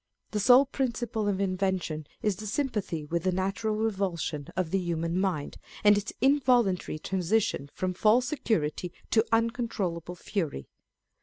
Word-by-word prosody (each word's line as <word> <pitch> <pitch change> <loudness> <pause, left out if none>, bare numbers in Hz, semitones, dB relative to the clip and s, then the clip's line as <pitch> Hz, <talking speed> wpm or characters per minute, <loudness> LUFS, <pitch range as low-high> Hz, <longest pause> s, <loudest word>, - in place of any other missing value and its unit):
The 210 - -1
sole 250 +6 +7
principle 240 -5 -2
of 195 -2 0
invention 185 -5 -1 0.2
is 210 -4 +1
the 215 - -6
sympathy 210 - -2
with 170 +3 -1
the 185 +2 +1
natural 195 +4 -1
revulsion 190 -9 -2
of 180 -3 0
the 195 - +2
human 170 0 -1
mind, 180 -7 -1 0.3
and 205 0 +7
its 205 0 -2
involuntary 250 - +3
transition 185 -4 0
from 185 0 -1
false 220 +6 +4
security 180 - -1 0.2
to 220 - +5
uncontrollable 225 -7 -1
fury. 165 - -3
195 Hz, 140 wpm, -28 LUFS, 175-225 Hz, 0.3 s, sole